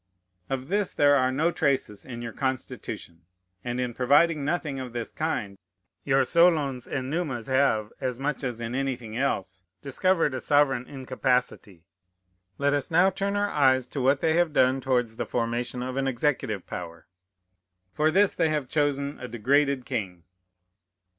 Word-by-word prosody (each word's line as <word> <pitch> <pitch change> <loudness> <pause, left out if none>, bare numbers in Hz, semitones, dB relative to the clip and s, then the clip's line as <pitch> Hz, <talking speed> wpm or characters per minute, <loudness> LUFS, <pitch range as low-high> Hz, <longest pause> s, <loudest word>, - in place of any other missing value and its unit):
Of 135 -1 -3
this 200 0 0
there 145 0 +5
are 130 -1 +2
no 155 +6 +1
traces 140 - -1
in 120 -2 -7
your 115 -1 -6
Constitution; 130 -9 -4 0.4
and 120 0 -3
in 125 -1 -2
providing 145 +5 +3
nothing 150 -2 -2
of 125 -2 -7
this 120 -1 -4
kind, 105 -11 -3 0.4
your 135 -1 +3
Solons 155 -7 +2
and 130 0 -3
Numas 140 -9 -2
have, 130 -6 +1
as 130 -2 -2
much 145 +2 -3
as 125 -3 -3
in 115 0 -4
anything 125 -4 -3
else, 100 -8 -2 0.2
discovered 165 +2 +1
a 130 - -2
sovereign 135 -4 +2
incapacity. 125 - -2 0.7
Let 140 0 +1
us 145 -2 -1
now 175 +4 +4
turn 200 +2 -2
our 205 0 0
eyes 130 -3 +3
to 140 - -3
what 135 +2 +3
they 160 - +2
have 170 -2 +2
done 130 0 +3
towards 125 -4 0
the - - -2
formation 120 +1 -2
of 130 +1 -4
an 135 0 0
executive 125 -6 -1
power. 85 -1 -7 0.9
For 155 +8 +2
this 195 +4 +3
they 160 - +1
have 150 -4 -1
chosen 145 -1 0
a 125 - -6
degraded 135 +3 +1
king. 95 - -4
135 Hz, 160 wpm, -26 LUFS, 120-145 Hz, 0.9 s, there